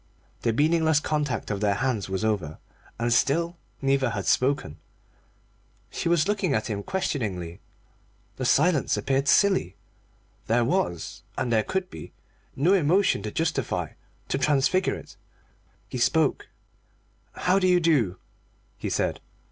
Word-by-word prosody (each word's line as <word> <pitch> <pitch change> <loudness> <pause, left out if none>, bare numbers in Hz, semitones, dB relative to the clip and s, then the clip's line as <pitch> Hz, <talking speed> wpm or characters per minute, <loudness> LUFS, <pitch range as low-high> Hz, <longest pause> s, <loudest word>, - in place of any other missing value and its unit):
The 115 - +1
meaningless 160 +4 +3
contact 150 -8 -2
of 100 -1 -3
their 100 -1 +2
hands 115 -3 -1
was 95 +3 -2
over, 90 -9 -1 0.4
and 120 0 +1
still 165 +8 +1 0.3
neither 135 -1 +2
had 100 -4 -4
spoken. 130 - +1 1.1
She - - -2
was 170 -1 +3
looking 195 -8 0
at 110 +1 -2
him 100 -1 -3
questioningly. 100 - -3 0.8
The 130 - -3
silence 150 -3 +3
appeared 135 +6 0
silly; 190 - +3 0.7
there 115 +1 +2
was, 115 - -2 0.2
and 125 -2 -1
there 110 - +4
could 185 +8 -3
be, - - -10 0.4
no 165 +8 +3
emotion 185 - +3
to 105 +1 -5
justify, 165 +5 -1 0.4
to - - 0
transfigure 150 +7 +2
it. - - -12 0.7
He - - -5
spoke. - - +1 0.9
"How 185 +2 +2
do 185 - +2
you 180 -1 +4
do?" 135 - +2 0.6
he - - -3
said. - - -1
135 Hz, 135 wpm, -26 LUFS, 110-170 Hz, 1.1 s, there